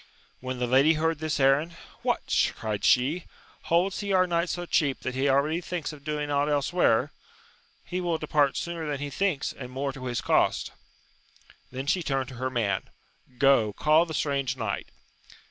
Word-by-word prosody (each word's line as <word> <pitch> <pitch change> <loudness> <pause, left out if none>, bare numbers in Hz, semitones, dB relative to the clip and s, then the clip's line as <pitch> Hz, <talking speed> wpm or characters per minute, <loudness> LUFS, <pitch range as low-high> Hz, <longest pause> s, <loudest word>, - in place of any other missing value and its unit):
When 130 0 -5
the 125 - 0
lady 135 +6 +5
heard 160 0 0
this 155 -1 -2
errand. 140 +5 +3 0.3
What! - - +1
cried 105 -2 -3
she, 145 +8 +3 0.4
holds 180 +3 +1
he 200 -1 -3
our 185 -1 +4
knight 170 0 0
so 175 0 -3
cheap 145 -5 +1
that 130 - -3
he 135 +2 +1
already 150 +5 +2
thinks 170 -3 -4
of 145 -2 -13
doing 150 -1 -3
ought 145 +1 +1
elsewhere 145 -3 +3
1 - - -10 0.8
he 180 +1 -3
will 170 -2 0
depart 150 -3 +1
sooner 170 -2 -4
than 145 -1 -2
he 145 0 -4
thiii^LS, 180 -3 -1
and 130 -2 -8
more 135 +1 -3
to 135 -2 -8
his 120 -1 -1
cost. - - +1 1.0
Then 130 +1 -5
she 180 +5 +1
turned 135 -5 -1
to 130 - -10
her 130 - 0
man: 105 -7 -1 0.5
Go, 135 -6 +4
call 155 +7 +3
the 160 - -5
strange 140 -3 -1
knight. 110 -4 -3
145 Hz, 180 wpm, -27 LUFS, 130-165 Hz, 1.0 s, lady